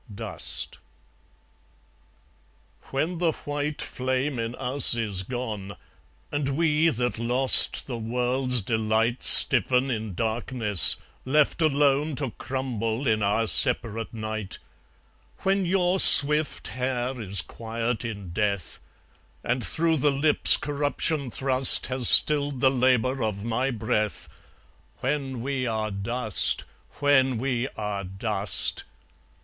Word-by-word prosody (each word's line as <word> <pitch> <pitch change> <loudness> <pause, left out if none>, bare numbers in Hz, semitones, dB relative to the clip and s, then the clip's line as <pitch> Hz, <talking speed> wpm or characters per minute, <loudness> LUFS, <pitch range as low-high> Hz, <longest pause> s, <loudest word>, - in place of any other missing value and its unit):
Dust 110 0 -2 2.1
When 160 +6 -5
the 170 -3 -1
white 145 +1 -6
flame 130 +1 -5
in 115 +1 -6
us 125 -1 +4
is 105 -5 0
gone, 105 -3 -8 0.6
And 145 -2 -4
we 160 0 0
that 120 -5 -5
lost 125 +3 +2
the 120 -4 -8
world's 125 +2 -2
delight 110 +3 -3
Stiffen 130 +1 +4
in 110 -5 -7
darkness, 110 -2 +2 0.3
left 150 +4 -1
alone 145 0 -1
To 135 -3 -6
crumble 125 -2 -6
in 110 -3 -1
our 105 +3 -2
separate 115 -2 +2
night; 110 -3 -6 0.8
When 195 -1 -2
your 185 0 -1
swift 150 0 +8
hair 125 0 -6
is 100 -4 -1
quiet 115 0 -7
in 100 -6 -9
death, 100 -3 -5 0.6
And 125 +1 -4
through 165 +4 -1
the 145 +1 -1
lips 145 +2 +4
corruption 145 0 -3
thrust 130 +1 +6
Has 130 -2 +2
stilled 145 -3 +4
the 130 0 +1
labour 130 0 -1
of 105 -1 -6
my 120 +3 -3
breath 110 -3 -4 0.7
When 135 -2 -5
we 135 -2 -5
are 110 -1 -5
dust, 110 +2 0 0.4
when 135 -3 0
we 125 0 -4
are 105 -2 -6
dust! 95 +1 -1
125 Hz, 115 wpm, -23 LUFS, 110-140 Hz, 2.1 s, swift